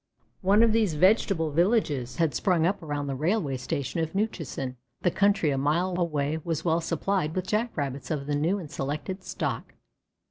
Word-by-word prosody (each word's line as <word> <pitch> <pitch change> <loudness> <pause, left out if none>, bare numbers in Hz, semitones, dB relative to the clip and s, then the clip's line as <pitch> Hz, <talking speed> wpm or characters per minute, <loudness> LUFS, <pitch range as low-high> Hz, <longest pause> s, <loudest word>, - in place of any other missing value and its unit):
One 200 +4 +5
of 230 - +5
these 215 -8 +2
vegetable 185 -2 +3
villages 150 - +1
had 160 0 +1
sprung 170 +4 +2
up 195 +2 0
around 145 -2 -3
the 140 - -2
railway 155 -1 0
station 140 +3 -3
of 160 +2 -2
Newchusen. 155 - -2 0.3
The 175 - +3
country 200 -6 +3
a 135 - 0
mile 170 +7 +1
away 155 -2 0
was 165 -1 -2
well 165 0 +2
supplied 165 0 -1
with 185 -1 -1
Jack 215 +3 -1
rabbits 135 -3 -3
of 145 -3 -2
the 145 - -2
new 160 +7 +1
and 165 -7 -8
selected 150 +6 -4
stock. - - -4
165 Hz, 180 wpm, -27 LUFS, 145-190 Hz, 0.3 s, One